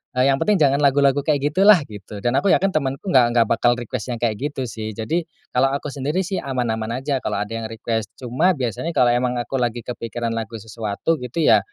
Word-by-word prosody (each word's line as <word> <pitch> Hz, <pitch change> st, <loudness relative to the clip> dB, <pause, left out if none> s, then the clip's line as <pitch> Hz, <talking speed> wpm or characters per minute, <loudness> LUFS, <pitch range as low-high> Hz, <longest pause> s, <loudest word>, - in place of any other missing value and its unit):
eee, 125 Hz, -, +3 dB
yang 135 Hz, -, +1 dB
penting 210 Hz, -, +2 dB
jangan 140 Hz, -5 st, +3 dB
lagu-lagu 140 Hz, -1 st, +3 dB
kayak 145 Hz, 0 st, 0 dB
gitulah, 190 Hz, 0 st, +6 dB
gitu. 105 Hz, -3 st, -10 dB
Dan 120 Hz, -, +2 dB
aku 200 Hz, -, -1 dB
yakin 195 Hz, 0 st, +3 dB
temanku 145 Hz, +4 st, -2 dB
enggak 125 Hz, -5 st, +6 dB
enggak 120 Hz, -, +6 dB
bakal 120 Hz, +1 st, +3 dB
request 120 Hz, 0 st, -5 dB
yang 120 Hz, -2 st, -4 dB
kayak 110 Hz, -3 st, 0 dB
gitu 140 Hz, -1 st, -3 dB
sih. 110 Hz, -3 st, -6 dB
Jadi, 160 Hz, +11 st, -2 dB, 0.2 s
kalo 130 Hz, +2 st, +3 dB
aku 140 Hz, -, -4 dB
sendiri 145 Hz, +6 st, -1 dB
sih, 190 Hz, +1 st, -3 dB
aman-aman 120 Hz, -2 st, -2 dB
aja 140 Hz, 0 st, 0 dB
kalo 110 Hz, -, -3 dB
ada 105 Hz, -, -4 dB
yang 115 Hz, 0 st, -4 dB
request. 110 Hz, -1 st, -4 dB
Cuma 130 Hz, +9 st, +1 dB
biasanya 135 Hz, -, -3 dB
kalau 125 Hz, -5 st, +4 dB
emang 125 Hz, 0 st, +1 dB
aku 120 Hz, +3 st, -3 dB
lagi 120 Hz, -1 st, -1 dB
kepikiran 120 Hz, 0 st, -4 dB
lagu 115 Hz, 0 st, -5 dB
sesuatu 110 Hz, +8 st, -2 dB
gitu 125 Hz, +6 st, -4 dB
ya, -, -, +6 dB
125 Hz, 215 wpm, -21 LUFS, 115-145 Hz, 0.2 s, gitulah